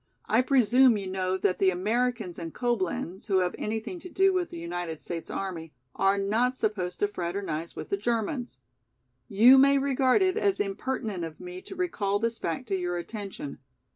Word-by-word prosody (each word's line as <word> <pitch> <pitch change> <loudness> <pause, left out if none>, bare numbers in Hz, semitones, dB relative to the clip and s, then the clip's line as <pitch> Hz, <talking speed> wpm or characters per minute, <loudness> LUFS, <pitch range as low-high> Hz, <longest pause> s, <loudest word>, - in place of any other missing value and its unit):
I 225 - +4
presume 255 -2 +5
you 200 - -5
know 185 0 -1
that 185 - 0
the 190 - +5
Americans 215 +1 -1
in 165 -1 -6
Coblenz, 195 -5 -2
who 195 -3 +2
have 180 -1 0
anything 220 +11 -3
to 360 - -10
do 385 +2 +3
with 360 -2 0
the - - -8
United 170 -1 -4
States 165 -2 -6
army, 170 -5 -5 0.2
are 195 +1 +2
not 225 +6 +1
supposed 185 -4 -2
to 205 - +4
fraternize 175 -4 -4
with - - -7
the 200 - 0
Germans. 230 - -2 0.7
You 240 +7 +7
may 275 +1 +6
regard 270 +5 +3
it 375 +2 +1
as 400 -3 +1
impertinent 205 -1 -2
of 160 -1 -7
me 180 0 -8
to 385 - -10
recall 220 - 0
this 230 +1 -2
fact 170 +9 -3
to 195 - +1
your 175 -1 -2
attention. 195 -5 -6
205 Hz, 180 wpm, -28 LUFS, 180-250 Hz, 0.7 s, You